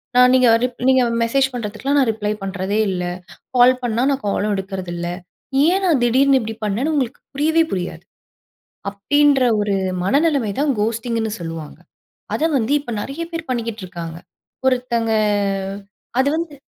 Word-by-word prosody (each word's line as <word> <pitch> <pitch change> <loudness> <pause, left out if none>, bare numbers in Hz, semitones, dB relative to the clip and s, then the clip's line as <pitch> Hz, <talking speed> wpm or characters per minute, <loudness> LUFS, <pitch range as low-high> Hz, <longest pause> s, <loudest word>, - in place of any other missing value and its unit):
நான் 250 0 +7
நீங்க 255 -1 +5 0.2
ரிப் 250 -1 -2
நீங்க 260 -1 +5 0.2
மெசேஜ் 270 +3 +2
பண்ணுறதுக்குலாம், 245 +5 -2
நான் 260 - +3
ரிப்ளை 210 -1 -3
பண்ணுறதே 195 +2 -2
இல்லை. 180 -1 -2 0.5
கால் 250 +1 +7
பண்ணா, 235 -1 0
நான் 275 -4 -1
காலும் 205 +1 0
எடுக்கறது 190 -2 -5
இல்லை. 175 0 -3 0.5
ஏன் 375 +3 +2
நான், 310 -7 +3
திடீர்னு 265 +3 +4
இப்படி 225 -1 -5
பண்ணேன்னு 230 +10 0
உங்களுக்கு 270 -3 -1
புரியவே 320 +4 +3
புரியாது. 180 -2 -3 0.9
அப்படின்ற 285 +6 +3 0.2
ஒரு 205 -1 0 0.3
மனநிலைமை 280 - +2
தான், 290 0 +2
கோஸ்ட்டிங்ன்னு 225 0 -1
சொல்லுவாங்க. 165 -2 -7 0.6
அத - - -2
வந்து 235 +1 -1
இப்ப 245 -4 -7
நெறைய 275 +9 -6
பேர் 330 -1 -4
பண்ணிக்கிட்ருக்காங்க. 185 -9 -5 0.5
ஒருத்தங்க. 240 -3 0 1.1
அது 265 - +3
வந்து 330 -3 -4
235 Hz, 140 wpm, -20 LUFS, 205-275 Hz, 1.1 s, நான்